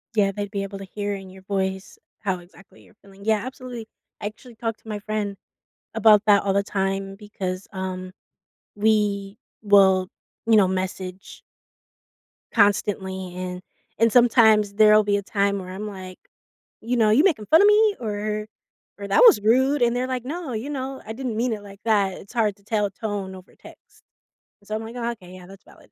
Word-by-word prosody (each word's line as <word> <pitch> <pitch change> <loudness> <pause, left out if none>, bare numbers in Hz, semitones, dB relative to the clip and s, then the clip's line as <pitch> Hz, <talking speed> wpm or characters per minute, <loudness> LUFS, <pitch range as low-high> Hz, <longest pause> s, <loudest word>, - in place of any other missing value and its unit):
Yeah, 200 -2 +3
they'd 205 0 -5
be 200 -1 -2
able 195 0 -7
to 195 - -8
hear 205 +1 -4
in 190 -1 -9
your 190 0 -14
voice 190 -1 -3 0.2
how 190 -3 -2
exactly 180 +2 -18
you're - - -22
feeling. 200 0 -16
Yeah, 220 -1 +3
absolutely, 255 -3 -8 0.3
I 205 - -2
actually 235 +2 -11
talk 225 -1 -3
to - - -22
my 210 -1 -4
friend 205 -1 -3 0.6
about 215 -1 +5
that 205 -2 +5
all 195 -1 +1
the 200 0 +2
time 195 -1 -2
because, 195 -3 -5
um, 185 -1 -5 0.6
we 205 -1 0 0.2
will, 190 -2 +5 0.4
you 225 -1 +5
know, 195 -3 +5
message 185 0 -5 1.1
constantly, 190 -3 +1
and 180 0 -5 0.4
and 230 -1 +4
sometimes 220 -4 +5
there'll 215 0 +6
be 205 0 +1
a - - -2
time 200 0 0
where 185 0 -8
I'm 200 +3 -6
like, 185 -2 -9 0.6
you 240 +2 -1
know, 220 -2 +4
"You 275 +9 +5
making 280 - +2
fun 320 - +5
of 410 - +6
me?" 420 0 +4
or 210 -1 -3 0.5
or, 200 -1 -7
"That 195 - +3
was 420 - +7
rude," 260 +6 +3
and 235 0 +2
they're 255 +1 -1
like, 255 -1 -3
"No," 310 -3 -5
you 230 +7 -4
know, 265 -1 -4
"I 220 - -6
didn't 240 -3 -4
mean 240 0 0
it 210 - -6
like 200 0 -13
that." 200 -4 +2
It's 200 - -13
hard 215 -4 +1
to 200 - -26
tell 210 -1 0
tone 200 -2 -5
over 185 0 -15
text. - - -17 0.6
So 215 - -4
I'm 220 - -4
like, 230 +2 -9
"Ah, 235 0 -2
okay, 185 -5 -12
yeah, 180 -1 -12
that's 195 0 -14
valid." - - -20
205 Hz, 190 wpm, -23 LUFS, 195-225 Hz, 1.1 s, was